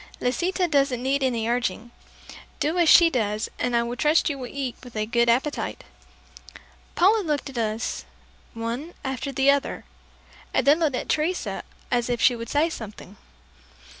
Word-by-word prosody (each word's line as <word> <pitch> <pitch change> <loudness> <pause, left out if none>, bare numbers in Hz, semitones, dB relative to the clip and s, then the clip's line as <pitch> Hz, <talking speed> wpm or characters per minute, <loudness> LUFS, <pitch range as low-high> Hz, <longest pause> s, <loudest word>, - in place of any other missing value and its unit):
Lisita 355 +8 0
doesn't 275 -5 +1
need 275 +2 +1
any 235 -4 0
urging. 235 -1 -1 0.7
Do 315 +4 0
as 335 -2 +4
she 340 -1 +8
does, 215 -5 -1
and 245 -1 0
I 235 0 +2
trust 300 +5 +2
you 280 - -6
will 250 - -5
eat 270 -2 -4
with 245 -2 -12
a 215 0 0
good 235 +1 +2
appetite." 265 +5 0 1.1
Paula 410 +5 +4
looked 295 -6 -2
at 255 - -10
us, 220 +1 -2 0.5
one 235 +9 -4
after 265 0 -3
the 275 0 +4
other, 280 -1 -2 0.7
and 260 - +2
then 290 +3 +5
looked 305 -6 +1
at - - -4
Teresa 330 +4 -1 0.3
as 240 0 +1
if 240 -1 0
she 245 - +4
would 230 -1 -7
say 295 +3 +2
something. 210 - -9
260 Hz, 165 wpm, -24 LUFS, 235-300 Hz, 1.1 s, she